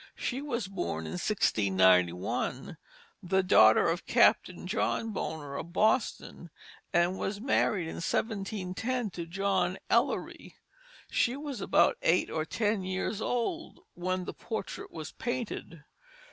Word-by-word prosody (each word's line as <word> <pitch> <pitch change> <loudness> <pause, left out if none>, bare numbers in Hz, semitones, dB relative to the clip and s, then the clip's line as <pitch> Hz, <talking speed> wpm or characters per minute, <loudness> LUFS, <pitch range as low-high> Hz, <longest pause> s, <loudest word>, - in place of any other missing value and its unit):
She 260 +2 -3
was 240 -8 -3
born 175 - -3
in - - -5
1691, 95 - +1 0.5
the 190 0 +1
daughter 110 -12 +6
of 170 +2 -2
Captain - - +3
John 225 - -1
Bonner 150 -8 -4
of 170 +4 -6
Boston, 215 -4 0 0.4
and 175 +2 +2
was 200 +1 -3
married 210 -7 +1
in - - -6
1710 210 +4 -2
to 170 -1 -6
John 190 0 0
Ellery. - - 0 0.6
She 245 - +2
was 285 -3 -5
about 475 - +3
eight - - +2
or 155 -1 -1
ten 210 +2 0
years 190 +3 -2
old 285 +10 -2
when 185 +1 -2
the - - -5
portrait 220 -4 -6
was 160 -2 -7
painted. 240 -10 -5
190 Hz, 125 wpm, -30 LUFS, 165-220 Hz, 0.6 s, daughter